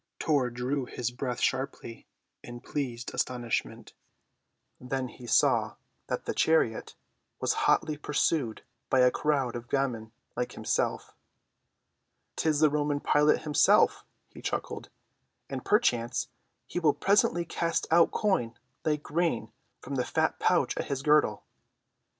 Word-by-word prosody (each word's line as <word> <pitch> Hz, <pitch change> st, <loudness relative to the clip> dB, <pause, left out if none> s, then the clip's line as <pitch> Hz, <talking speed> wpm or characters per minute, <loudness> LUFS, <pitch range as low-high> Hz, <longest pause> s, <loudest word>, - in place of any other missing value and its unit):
Tor 140 Hz, -5 st, +1 dB
drew 125 Hz, +3 st, -2 dB
his 120 Hz, -1 st, -3 dB
breath 125 Hz, -1 st, -4 dB
sharply 130 Hz, -3 st, -3 dB, 0.3 s
in 120 Hz, 0 st, -9 dB
pleased 125 Hz, -4 st, -4 dB
astonishment. 120 Hz, -4 st, -3 dB, 0.9 s
Then 130 Hz, 0 st, -3 dB
he 120 Hz, 0 st, -12 dB
saw -, -, +3 dB, 0.3 s
that -, -, -3 dB
the -, -, -2 dB
chariot 160 Hz, -9 st, +1 dB, 0.4 s
was -, -, +1 dB, 0.2 s
hotly 155 Hz, -1 st, +2 dB
pursued 145 Hz, -5 st, 0 dB, 0.3 s
by 130 Hz, -, +4 dB
a 125 Hz, 0 st, +5 dB
crowd 135 Hz, -5 st, 0 dB
of 120 Hz, 0 st, -7 dB
gamins 125 Hz, -5 st, -1 dB, 0.3 s
like -, -, -3 dB
himself. -, -, -2 dB, 1.2 s
"'Tis 155 Hz, -2 st, +1 dB
the 155 Hz, -2 st, +5 dB
Roman 145 Hz, -1 st, 0 dB
Pilate 150 Hz, +1 st, +3 dB
himself," 150 Hz, -2 st, +4 dB, 0.3 s
he -, -, -12 dB
chuckled, -, -, -4 dB, 0.6 s
"and 130 Hz, -2 st, -4 dB
perchance 125 Hz, -, +1 dB, 0.4 s
he -, -, -3 dB
will 155 Hz, -4 st, +3 dB
presently 195 Hz, -3 st, +2 dB
cast 170 Hz, 0 st, -1 dB
out 170 Hz, 0 st, +6 dB
coin 120 Hz, -, 0 dB, 0.3 s
like 150 Hz, -1 st, 0 dB
grain 165 Hz, -6 st, -1 dB, 0.3 s
from 140 Hz, -, -7 dB
the 125 Hz, -, +1 dB
fat -, -, 0 dB
pouch -, -, +2 dB
at -, -, -2 dB
his 135 Hz, -1 st, -3 dB
girdle." 150 Hz, 0 st, +3 dB
135 Hz, 130 wpm, -29 LUFS, 125-150 Hz, 1.2 s, out